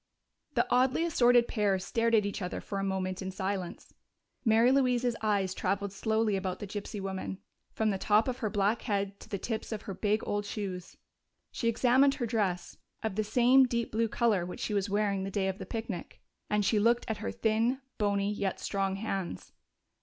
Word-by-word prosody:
The - - +3
oddly 260 +6 +3
assorted 245 -7 +4
pair 205 -4 +1
stared 230 +4 +1
at 210 -2 +3
each 205 0 -3
other 180 - -3
for 200 - -4
a - - -1
moment 190 -1 -2
in 190 - -3
silence. 190 -1 -4 0.5
Mary 230 +1 +5
Louise's 250 -3 +2
eyes 200 -4 +1
traveled 195 +1 -1
slowly 220 0 +1
about 190 -1 -2
the - - -6
gypsy 205 +1 -5
woman, 190 -1 -4 0.3
from 220 -1 +1
the 195 - -2
top 210 +4 +3
of 255 0 -2
her 220 - -1
black 205 +3 +1
head 200 -3 -2
to - - -13
the 200 - -2
tips 220 +3 -4
of 220 -1 -4
her 200 - -5
big 210 +3 0
old 205 0 -1
shoes. 195 -4 -5 0.5
She 230 - -2
examined 260 +4 +4
her 260 -5 -2
dress 205 -6 -1 0.3
of 220 -2 -1
the 215 +2 0
same 250 +4 +5
deep 235 -1 -2
blue 225 +1 +1
color 220 -4 +1
which 180 - -7
she - - -2
was 200 0 0
wearing 200 -1 0
the 195 - -3
day 195 -1 0
of 190 0 -3
the - - -7
picnic 220 -5 -5 0.3
and 210 -1 +1
she 215 - +3
looked 235 +3 +3
at 220 - -2
her 215 - -4
thin, 225 +4 +1 0.2
bony, 200 -1 +1
yet 200 -2 -2
strong 195 -1 -1
hands.... 195 - -4
210 Hz, 200 wpm, -30 LUFS, 195-230 Hz, 0.5 s, Mary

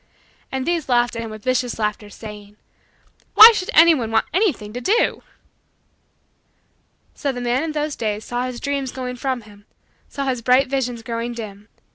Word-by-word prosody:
And 265 -1 -3
these 340 -5 -1
laughed 240 -1 +2
at 230 - -4
him 225 - -6
with 215 -1 -10
vicious 255 -1 -1
laughter, 210 -1 -3
saying: 210 -1 -11 0.8
"Why 445 +2 +12
should 380 -3 -3
anyone 315 -8 +5
want 225 0 +1
anything 315 - 0
to 245 - -5
do?" 440 - +1 1.9
So 280 - -2
the 245 - -6
man 245 +2 0
in 320 -1 -3
those 300 -1 -2
days 215 -1 -3
saw 245 +1 -2
his 250 -1 -6
dreams 280 -2 -3
going 250 -1 -6
from 260 -1 -2
him 205 -1 -18 0.4
saw 280 -1 -4
his 255 -3 -2
bright 255 +3 +4
visions 250 -4 -2
growing 230 +1 -4
dim. 210 -3 -9
245 Hz, 170 wpm, -21 LUFS, 225-275 Hz, 1.9 s, Why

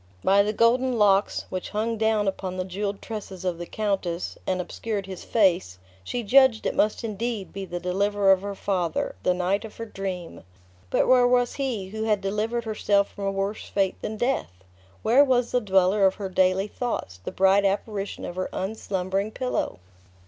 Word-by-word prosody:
By 195 +1 +5
the 205 +1 +1
golden 240 +3 +2
locks, 200 -2 +3
which 185 -1 -4
hung 220 +2 -1
down 220 -2 +1
upon 190 -1 -3
the 185 - -2
jeweled 200 +2 -4
tresses 195 -4 -7
of 175 -2 -1
the 175 - -6
countess, 195 -5 -2
and 185 -1 0
obscured 200 +3 -4
his 190 -2 -8
face, 180 - +2 0.3
she 240 - -3
judged 260 0 +5
it - - 0
must 215 +2 +1
indeed 225 -1 -3
be 195 0 -5
the 175 -1 -5
deliverer 195 +2 +2
of 190 -1 +4
her 200 0 -5
father, 180 -5 -1
the 180 - +2
knight 185 +3 0
of 220 - -10
her 230 - -5
dream. 190 -5 -6 0.5
But - - +2
where 250 -1 +6
was 245 -1 +2
he, 240 -9 -3
who 220 +2 -4
had 210 -2 +2
delivered 210 +4 -1
herself 205 -2 +1
from 200 - -6
a 195 - +1
worse 195 +2 -3
fate 195 -2 0
than 215 0 -4
death? 215 - -2 0.4
Where 250 +6 +6
was 250 -3 +2
the 250 - +2
dweller 195 0 +4
of 190 - 0
her 195 -2 -5
daily 185 +1 +2
thoughts, 205 - -4
the - - -4
bright 195 +1 +4
apparition 200 0 -2
of 175 - -7
her 185 - -2
unslumbering 195 0 -2
pillow? 250 +3 -2
200 Hz, 185 wpm, -25 LUFS, 190-220 Hz, 0.5 s, where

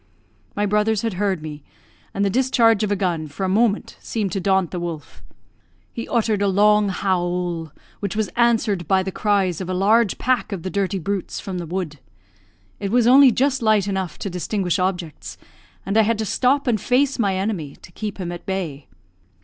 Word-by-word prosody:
My 205 - +1
brothers 210 +1 +1
had 225 -3 -1
heard 190 -3 -1
me, 150 -1 -7 0.5
and 200 - 0
the - - +2
discharge 235 -3 +3
of 210 -1 0
a - - +3
gun, 175 -5 -1
for 145 +6 -6
a - - +1
moment, 210 +2 +1
seemed 210 -5 -3
to 195 - -1
daunt 190 -2 +1
the 180 - -3
wolf. 170 -4 -7 0.7
He 230 - -5
uttered 220 -4 +1
a 200 - +2
long 210 +1 +4
howl, 175 -3 -1 0.3
which 200 0 -3
was 220 -1 0
answered 225 -7 +2
by 190 +1 +3
the 190 - -4
cries 195 -4 0
of 185 - -5
a 185 - -1
large 210 +2 +3
pack 255 -3 0
of 190 -5 -4
the 185 - -4
dirty 195 -1 -1
brutes 195 +2 -3
from 185 -2 -5
the 170 - -6
wood. 170 -4 -4 0.8
It 200 - -3
was 240 +2 +3
only 260 +2 +7
just 270 +2 +1
light 215 -3 +3
enough 190 -5 -3
to 200 - -4
distinguish 180 +1 -1
objects, 180 -4 -3 0.5
and 195 +2 -2
I 220 - +6
had 220 +1 +1
to 220 - -2
stop 270 +6 +1
and 225 -6 +1
face 270 +1 +1
my 200 -4 +1
enemy, 185 -7 -3
to - - -16
keep 210 +2 -5
him 180 -3 -4
at 175 0 -7
bay. 165 -8 -4
195 Hz, 200 wpm, -22 LUFS, 180-220 Hz, 0.8 s, only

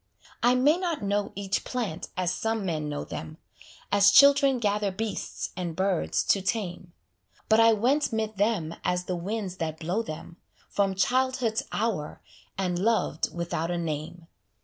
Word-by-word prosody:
I 245 +1 +4
may 290 +6 +4
not 345 - -2
know 200 0 0
each 195 0 -2
plant 230 -10 -3
as 180 -1 0
some 225 0 -2
men 155 -4 -2
know 145 -1 -3
them, 155 - -7 0.5
As 200 0 +6
children 275 +2 +6
gather 210 -3 0
beasts 210 +1 -4
and 175 -3 -4
birds 190 -1 0
to 195 - +2
tame; 185 -3 -3 0.6
But 220 0 +5
I 225 0 +7
went 255 +8 +2
'mid 220 -2 -2
them 195 -6 0
as 180 0 0
the 180 0 -3
winds 190 +1 -4
that 160 -2 -3
blow 180 +7 -1
them, 165 -3 -8 0.3
From 195 -1 0
childhood's 250 +2 +1
hour, 205 -9 -2 0.4
and 180 -2 -1
loved 225 +3 +1
without 170 -1 -3
a 175 - -1
name. 165 +1 -4
200 Hz, 155 wpm, -27 LUFS, 175-225 Hz, 0.6 s, I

